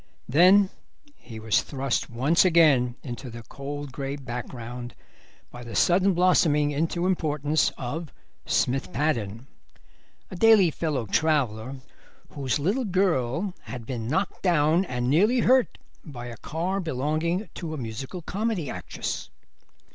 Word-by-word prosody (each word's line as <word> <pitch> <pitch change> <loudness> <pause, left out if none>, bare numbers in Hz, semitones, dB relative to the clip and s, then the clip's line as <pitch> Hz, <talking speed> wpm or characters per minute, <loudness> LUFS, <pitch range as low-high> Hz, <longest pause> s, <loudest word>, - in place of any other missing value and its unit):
Then 185 +8 +5 0.4
he 110 -2 -11
was 110 -1 +2
thrust 135 -3 -2
once 135 +8 +3
again 150 -9 +4
into 125 0 -6
the 115 0 -9
cold 145 +2 -7
grey 135 +1 -4
background 125 -2 -7 0.6
by 120 - -9
the 115 -3 -8
sudden 185 - +3
blossoming 160 -5 +3
into 165 +4 -1
importance 155 -4 +1
of 145 +5 -5 0.4
Smith 135 +6 0
Paddon, 120 - -1 0.9
a - - -6
daily 210 -3 +6
fellow 145 -7 -2
traveller, 130 -2 0 0.5
whose 135 -3 -1
little 200 - 0
girl 180 - 0
had 115 +1 -7
been 115 -3 -4
knocked 185 +9 -1
down 170 0 +3
and 125 -5 -2
nearly 210 - +3
hurt 255 0 +3 0.3
by 125 -6 -8
a 120 -2 -8
car 175 - -2
belonging 160 - -1
to 160 -3 -5
a - - -6
musical 130 - -6
comedy 200 - -2
actress. - - -5
150 Hz, 130 wpm, -26 LUFS, 125-175 Hz, 0.9 s, daily